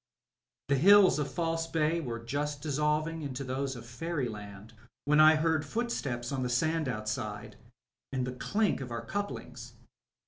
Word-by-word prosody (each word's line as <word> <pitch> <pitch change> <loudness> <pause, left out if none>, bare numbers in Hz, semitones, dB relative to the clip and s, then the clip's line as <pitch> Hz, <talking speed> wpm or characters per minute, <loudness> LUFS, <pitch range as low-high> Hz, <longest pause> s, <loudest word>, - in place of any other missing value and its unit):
The 140 - +3
hills 195 +2 +7
of 145 - -2
False 165 -1 -1
Bay 165 +1 +1
were 120 -6 -4
just 145 +5 -3
dissolving 150 +2 0
into 140 -2 -4
those 135 +1 -2
of 120 -1 -9
fairyland 115 - -5 0.3
when 150 +2 +4
I 155 0 +8
heard 160 -1 +1
footsteps 140 - -3
on 135 -2 -2
the 125 - -1
sand 155 +5 +1
outside 105 -2 -4 0.6
and 130 -2 -1
the 125 - -4
clink 135 - 0
of 130 - -5
our 115 -1 -5
couplings. 205 - -5
140 Hz, 150 wpm, -30 LUFS, 125-160 Hz, 0.6 s, I